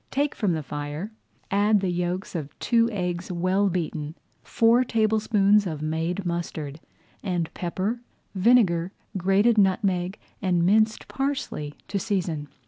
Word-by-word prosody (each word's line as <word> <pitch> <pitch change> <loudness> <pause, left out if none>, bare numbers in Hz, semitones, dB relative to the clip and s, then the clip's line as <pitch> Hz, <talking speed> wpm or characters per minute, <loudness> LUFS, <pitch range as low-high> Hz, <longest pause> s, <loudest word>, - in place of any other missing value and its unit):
Take 285 +2 0
from 200 -6 0
the 160 -2 -2
fire, 145 +8 -5 0.4
add 205 +1 +4
the 190 -2 -1
yolks 180 +2 -2
of 155 -5 -5
two 230 -1 +2
eggs 180 -4 -3
well 185 +3 +1
beaten, 160 -3 -3 0.3
four 235 +2 +3
tablespoonfuls 215 -3 +3
of 155 -3 -4
made 165 +4 -2
mustard, 165 -4 -4 0.4
and 175 -4 -2
pepper, 190 +7 -2 0.3
vinegar, 190 -4 +3 0.2
grated 195 +5 +3
nutmeg, 190 -1 +1 0.2
and 175 -3 +2
minced 215 +3 +2
parsley 270 - -3
to 200 - -2
season. 180 -8 -2
185 Hz, 130 wpm, -25 LUFS, 170-215 Hz, 0.4 s, add